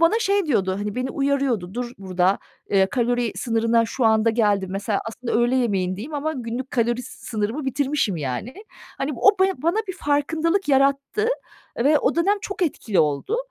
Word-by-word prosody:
bana 335 +7 +4
şey 400 -4 +1
diyordu, 195 -10 +1
hani, 205 0 -3
beni 255 +1 -2
uyarıyordu. 270 -9 0
"Dur 245 0 -4
burada, 185 0 +1 0.3
ııı, 190 -1 +5
kalori 245 -2 0
sınırına 230 -1 +1
şu 245 +1 -2
anda 220 0 +4
geldin." 205 -4 +1
Mesela 200 +1 -1
aslında 235 +2 -5
öğle 240 +3 +2
yemeğindeyim 205 +3 -1
ama 300 +2 -1
günlük 250 -1 -5
kalori 240 +1 0
sınırımı 230 +2 -4
bitirmişim, 270 - 0
yani. 145 - -4 0.4
Hani, 275 +2 -2
bu - - -9
o 390 -2 +5
be 385 - +2
bana 335 +10 +1
bir 375 - -3
farkındalık 320 +5 0
yarattı. 275 - +2 0.5
Ve 290 +5 +4
o - - +1
dönem 395 +5 +2
çok 395 -1 -4
etkili 225 - +1
oldu. 150 - 0
245 Hz, 170 wpm, -23 LUFS, 210-290 Hz, 0.5 s, ııı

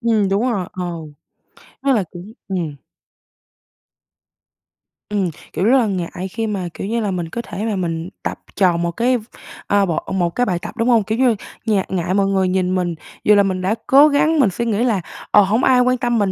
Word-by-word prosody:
Ừm, 220 -4 +2
đúng 200 +3 +1
rồi, 190 -5 -2
ờ. 185 - -4 1.0
Rất 275 0 +3
là 210 -6 +1
đúng, 180 +5 -9 0.2
ừm. 170 -6 -3 2.3
Ừm, 200 -4 0 0.2
kiểu, 185 - 0
rất 250 +5 +5
là 235 -4 +2
ngại 185 -1 -3
khi 225 0 -2
mà, 195 -4 -2
kiểu 195 - -5
như 230 +2 -1
là, 205 -3 -1
mình 175 -3 -3
có 235 - -4
thể 215 -2 -5
mà 220 -2 -1
mình 170 -2 -3
tập - - -3 0.2
tròn 175 -3 +3
một 170 0 0
cái, 245 +6 +1 0.5
ờ, 200 -1 +3
bộ 170 -3 0
một 175 -3 +1
cái 245 - +2
bài 180 -5 -1
tập, 215 - -8
đúng 230 +2 +1
hông? 230 -4 +4
Kiểu 220 +3 -2
như, 250 -3 +3 0.3
ngại 210 -4 +1
ngại 180 -1 -1
mọi 200 0 +2
người 190 -1 +1
nhìn 185 0 0
mình, 175 -2 -1 0.3
dù 210 - +5
là 200 - +5
mình 185 -1 -1
đã 195 +4 +1
cố 280 +3 +7
gắng 305 +2 +2
mình 240 -8 +5
suy 235 +6 -3
nghĩ 225 0 +1
là 220 -7 +1 0.3
"Ờ, 210 - +7
hông 215 +6 +1
ai 255 -1 +5
quan 255 0 +2
tâm 240 -2 0
mình 200 -2 +1
200 Hz, 215 wpm, -19 LUFS, 185-230 Hz, 2.3 s, cố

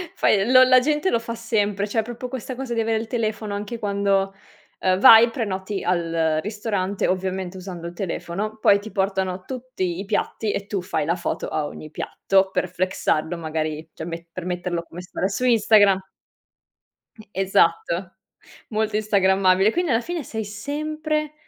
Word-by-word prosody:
Fai 205 +3 +2
lo 255 0 +9
la 255 0 +6
gente 300 +7 +1
lo 230 - +2
fa 230 0 -5
sempre, 210 -3 0
cioè 220 +2 +1
proprio 240 +2 -7
questa 260 0 -5
cosa 260 -2 -4
di 230 - -1
avere 225 0 +1
il 225 - -5
telefono 215 -3 -2
anche 210 +3 -5
quando, 200 -2 +1 0.5
uhm, 185 0 +2
vai, 225 +3 +9
prenoti 200 -4 -3
al 165 -3 +1
ristorante, 205 -2 -2
ovviamente 185 0 -2
usando 180 -2 -7
il 170 - -8
telefono, 195 +3 -4
poi 205 -2 +4
ti 215 +1 -9
portano 190 -2 -1
tutti 240 -9 -4
i 195 - -4
piatti 210 +1 -1
e 200 - -3
tu 200 -3 -2
fai 160 -5 -2
la 170 - +1
foto 175 - -3
a 155 - -2
ogni 155 +1 -8
piatto 190 +3 +1
per 185 - -1
flexarlo 175 -2 -1
magari, 155 -1 -3
cioè 160 - -7
me 170 0 -7
per 180 0 -7
metterlo 175 -1 -2
come 175 - -9
stare 180 +1 -3
su 200 +6 -2
Instagram. 210 -4 +5 1.2
E 215 -2 -16
esatto, 185 -1 +1 0.5
molto 220 -1 -1
instagrammabile. 195 -2 +3
Quindi 350 -2 0
alla 225 - +3
fine 340 +4 -4
sei 220 -3 -4
sempre 305 +7 -3
200 Hz, 170 wpm, -23 LUFS, 185-225 Hz, 1.2 s, lo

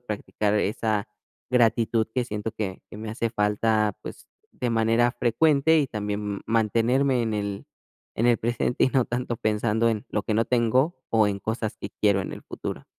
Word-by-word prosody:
practicar 105 -2 -2
esa 105 0 0 0.4
gratitud 115 -2 +2
que 125 - +1
siento 105 -1 -4
que 100 -4 -5
que - - -9
me 110 - -6
hace 115 +1 -2
falta, 105 0 +1
pues, - - -9 0.3
de 120 -1 -2
manera 115 +2 +2
frecuente, 150 +6 +3
y 145 - +2
también, 105 -2 -3
mm, - - -8
mantenerme 115 +4 +2
en 110 -1 -1
el 100 -1 -4 0.5
en 115 - +2
el 120 - +5
presente, 120 +1 0
y - - +3
no 130 -3 +2
tanto 120 -1 -2
pensando 110 +1 +1
en 105 -2 -3
lo 105 - -1
que 110 - -1
no 115 - +2
tengo 125 +7 +2
o 110 -2 +4
en 100 - -2
cosas 110 -1 -3
que 100 - -6
quiero 100 -2 +3
en - - -6
el - - -9
futuro. - - -6
110 Hz, 185 wpm, -25 LUFS, 105-120 Hz, 0.5 s, el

